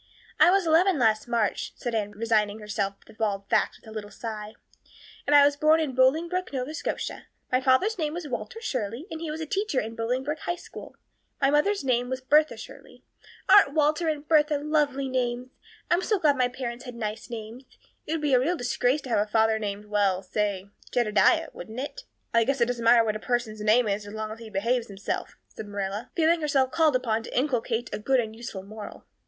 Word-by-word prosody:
"I -, -, +7 dB
was 390 Hz, 0 st, +3 dB
eleven 335 Hz, +2 st, +4 dB
last 220 Hz, -2 st, +2 dB
March," 230 Hz, -4 st, -1 dB
said 240 Hz, -, -4 dB
Anne, 210 Hz, -2 st, -1 dB
resigning 215 Hz, -1 st, +1 dB
herself 210 Hz, -2 st, -3 dB
to -, -, -16 dB
bald 200 Hz, -3 st, -2 dB
facts -, -, +1 dB
with -, -, -20 dB
a -, -, -10 dB
little 215 Hz, -1 st, -6 dB
sigh. 215 Hz, 0 st, -7 dB, 0.7 s
"And 290 Hz, -, +4 dB
I 285 Hz, -1 st, +8 dB
was 285 Hz, 0 st, +3 dB
born 310 Hz, +2 st, +4 dB
in 305 Hz, -5 st, -1 dB
Bolingbroke, 325 Hz, +8 st, +2 dB
Nova 265 Hz, +2 st, -3 dB
Scotia. 315 Hz, -, -4 dB, 0.2 s
My 255 Hz, 0 st, +2 dB
father's 275 Hz, +12 st, +2 dB
name 305 Hz, -1 st, -1 dB
was 345 Hz, -3 st, -5 dB
Walter 290 Hz, -, -5 dB
Shirley, 250 Hz, -, -3 dB
and 320 Hz, 0 st, -6 dB
he 330 Hz, -, -4 dB
was 310 Hz, +1 st, -4 dB
a -, -, -2 dB
teacher 390 Hz, -3 st, -1 dB
in 220 Hz, -, -4 dB
the 230 Hz, -, -13 dB
Bolingbroke 260 Hz, +6 st, -2 dB
High 350 Hz, -, -2 dB
School. -, -, -11 dB, 0.4 s
My 275 Hz, -1 st, +3 dB
mother's 345 Hz, +6 st, +2 dB
name 245 Hz, -2 st, +1 dB
was 260 Hz, 0 st, -2 dB
Bertha 300 Hz, +4 st, +3 dB
Shirley. -, -, -12 dB, 0.4 s
Aren't 310 Hz, -8 st, +6 dB
Walter 310 Hz, +2 st, +2 dB
and 300 Hz, -1 st, -2 dB
Bertha 300 Hz, -2 st, +4 dB
lovely 290 Hz, -2 st, 0 dB
names? 250 Hz, -1 st, -2 dB, 0.4 s
I'm 345 Hz, +1 st, +4 dB
so 420 Hz, +2 st, +1 dB
glad 300 Hz, -6 st, +3 dB
my 255 Hz, -2 st, +2 dB
parents 245 Hz, -1 st, -6 dB
had 245 Hz, -1 st, -8 dB
nice 220 Hz, 0 st, -5 dB
names. 230 Hz, +2 st, -8 dB, 0.4 s
It 315 Hz, -, -1 dB
would 325 Hz, -, -2 dB
be 290 Hz, -2 st, +2 dB
a 250 Hz, -, +6 dB
real 335 Hz, +8 st, 0 dB
disgrace 250 Hz, +2 st, 0 dB
to 260 Hz, -, -9 dB
have 225 Hz, -, +2 dB
a 210 Hz, +1 st, 0 dB
father 220 Hz, 0 st, +3 dB
named 205 Hz, -1 st, -4 dB
well, 200 Hz, -3 st, +1 dB
say 200 Hz, 0 st, -2 dB, 0.2 s
Jedediah, 215 Hz, -4 st, +3 dB
wouldn't 225 Hz, +3 st, -8 dB
it?" 400 Hz, -, -6 dB, 0.3 s
"I 230 Hz, 0 st, +5 dB
guess 270 Hz, +3 st, 0 dB
it 235 Hz, -, +4 dB
doesn't 240 Hz, -1 st, -3 dB
matter 230 Hz, 0 st, +6 dB
what 215 Hz, -1 st, -1 dB
a -, -, -4 dB
person's 235 Hz, -3 st, -2 dB
name 220 Hz, +3 st, +4 dB
is 205 Hz, 0 st, -2 dB
as 205 Hz, -, -8 dB
long 215 Hz, 0 st, -4 dB
as 220 Hz, -, -8 dB
he 225 Hz, -1 st, -9 dB
behaves 230 Hz, +4 st, 0 dB
himself," 200 Hz, -1 st, -5 dB
said 215 Hz, -, -9 dB
Marilla, 200 Hz, +1 st, -4 dB
feeling 330 Hz, 0 st, +3 dB
herself 275 Hz, -3 st, +1 dB
called 320 Hz, -3 st, +3 dB
upon 230 Hz, -3 st, 0 dB
to 230 Hz, -, -7 dB
inculcate 245 Hz, -3 st, 0 dB
a -, -, -3 dB
good 260 Hz, +4 st, +2 dB
and 220 Hz, -2 st, -3 dB
useful 225 Hz, -5 st, -7 dB
moral. 210 Hz, +1 st, -10 dB
245 Hz, 215 wpm, -26 LUFS, 215-295 Hz, 0.7 s, I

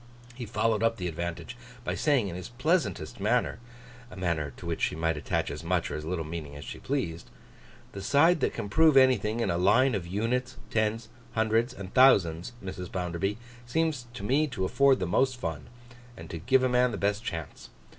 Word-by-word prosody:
He 120 Hz, -1 st, -7 dB
followed 110 Hz, 0 st, +1 dB
up 115 Hz, 0 st, +2 dB
the 90 Hz, -, -3 dB
advantage, 85 Hz, +7 st, -5 dB, 0.3 s
by -, -, -2 dB
saying 140 Hz, -8 st, +2 dB
in 85 Hz, -, -5 dB
his 90 Hz, +4 st, -7 dB
pleasantest 155 Hz, +9 st, -1 dB
manner: -, -, +1 dB, 0.5 s
a -, -, -11 dB
manner 85 Hz, -6 st, -1 dB
to -, -, -10 dB
which -, -, -3 dB
she -, -, +1 dB
might 80 Hz, 0 st, 0 dB
attach 70 Hz, 0 st, -2 dB
as 75 Hz, +3 st, -7 dB
much 85 Hz, 0 st, 0 dB
or -, -, -3 dB
as 75 Hz, -, -5 dB
little 80 Hz, 0 st, -3 dB
meaning 75 Hz, -3 st, -6 dB
as 75 Hz, -1 st, -9 dB
she -, -, -7 dB
pleased: 90 Hz, -, -3 dB, 0.6 s
'The 100 Hz, -, -7 dB
side 160 Hz, -, +4 dB
that -, -, +1 dB
can 115 Hz, -3 st, -5 dB
prove 155 Hz, +5 st, +5 dB
anything 120 Hz, -4 st, +4 dB
in 115 Hz, -, +1 dB
a 85 Hz, -, 0 dB
line 125 Hz, +8 st, +4 dB
of 95 Hz, -5 st, -3 dB
units, 115 Hz, +7 st, -1 dB
tens, 110 Hz, +1 st, 0 dB, 0.2 s
hundreds, 110 Hz, +2 st, +1 dB
and 95 Hz, -1 st, -9 dB
thousands, 100 Hz, -7 st, +4 dB
Mrs. 90 Hz, -1 st, -6 dB
Bounderby, 90 Hz, +3 st, -2 dB, 0.3 s
seems 155 Hz, -3 st, -1 dB
to 115 Hz, -, -7 dB
me 140 Hz, +8 st, +2 dB
to 95 Hz, -9 st, -3 dB
afford 130 Hz, +6 st, +4 dB
the 90 Hz, -, -1 dB
most 130 Hz, +9 st, +1 dB
fun, 80 Hz, -9 st, -5 dB, 0.5 s
and -, -, -10 dB
to 85 Hz, -, -5 dB
give 130 Hz, +9 st, +3 dB
a -, -, +4 dB
man 125 Hz, 0 st, +3 dB
the 115 Hz, -, -4 dB
best 105 Hz, +2 st, 0 dB
chance. 80 Hz, -8 st, -6 dB
105 Hz, 200 wpm, -28 LUFS, 85-125 Hz, 0.6 s, prove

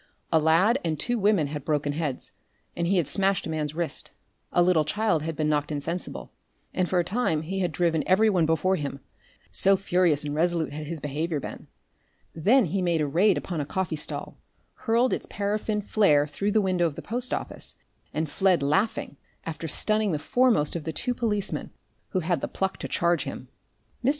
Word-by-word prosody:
A 160 Hz, -, +6 dB
lad 170 Hz, -, +4 dB
and 155 Hz, -3 st, -1 dB
two 240 Hz, +6 st, -1 dB
women 200 Hz, -6 st, +3 dB
had 145 Hz, 0 st, -5 dB
broken 145 Hz, -1 st, 0 dB
heads, 150 Hz, -4 st, -3 dB, 0.4 s
and 170 Hz, 0 st, -1 dB
he 190 Hz, +2 st, +2 dB
had 165 Hz, -6 st, +1 dB
smashed 195 Hz, -1 st, +2 dB
a 160 Hz, -, -4 dB
man's 155 Hz, -1 st, -2 dB
wrist; 170 Hz, -1 st, -2 dB, 0.4 s
a 175 Hz, -, +4 dB
little 175 Hz, -3 st, +4 dB
child 185 Hz, +1 st, +1 dB
had 160 Hz, +1 st, -3 dB
been 155 Hz, 0 st, 0 dB
knocked 150 Hz, 0 st, 0 dB
insensible, 160 Hz, +5 st, -4 dB, 0.4 s
and 185 Hz, -1 st, 0 dB
for 185 Hz, -, +1 dB
a 175 Hz, -, +3 dB
time 180 Hz, -5 st, 0 dB
he 190 Hz, +4 st, -3 dB
had 180 Hz, -3 st, 0 dB
driven 165 Hz, -2 st, +1 dB
every 190 Hz, +4 st, +4 dB
one 180 Hz, -6 st, +3 dB
before 165 Hz, +4 st, +2 dB
him, 140 Hz, -2 st, -4 dB, 0.5 s
so 195 Hz, -, +4 dB
furious 180 Hz, -6 st, +2 dB
and 145 Hz, -1 st, -3 dB
resolute 165 Hz, -1 st, 0 dB
had 150 Hz, 0 st, -6 dB
his 165 Hz, 0 st, -4 dB
behaviour 150 Hz, +2 st, -2 dB
been. -, -, -8 dB, 0.7 s
Then 215 Hz, -, +4 dB
he 190 Hz, +3 st, -1 dB
made 170 Hz, -2 st, +1 dB
a 150 Hz, -, +1 dB
raid 180 Hz, +7 st, +3 dB
upon 170 Hz, -5 st, -3 dB
a -, -, -1 dB
coffee 175 Hz, +2 st, -2 dB
stall, 150 Hz, -, -5 dB, 0.3 s
hurled 235 Hz, +2 st, +1 dB
its -, -, -3 dB
paraffin 210 Hz, +1 st, -1 dB
flare 155 Hz, -9 st, +3 dB
through 200 Hz, +8 st, -2 dB
the 215 Hz, -, +4 dB
window 185 Hz, -3 st, +2 dB
of 150 Hz, -, -6 dB
the -, -, -8 dB
post 245 Hz, +2 st, -1 dB
office, -, -, -4 dB, 0.4 s
and 155 Hz, +1 st, -1 dB
fled 180 Hz, +1 st, +2 dB
laughing, 170 Hz, 0 st, 0 dB, 0.3 s
after 165 Hz, 0 st, -5 dB
stunning 215 Hz, +4 st, +2 dB
the -, -, +1 dB
foremost 225 Hz, -, +2 dB
of 165 Hz, -, -3 dB
the 160 Hz, +1 st, -4 dB
two 245 Hz, -, -1 dB
policemen 210 Hz, -5 st, 0 dB, 0.4 s
who 185 Hz, -, -1 dB
had 170 Hz, -3 st, 0 dB
the -, -, -2 dB
pluck 190 Hz, 0 st, -2 dB
to -, -, -5 dB
charge 170 Hz, 0 st, +1 dB
him. -, -, -7 dB, 0.5 s
Mr. 250 Hz, -, +3 dB
170 Hz, 200 wpm, -26 LUFS, 155-195 Hz, 0.7 s, A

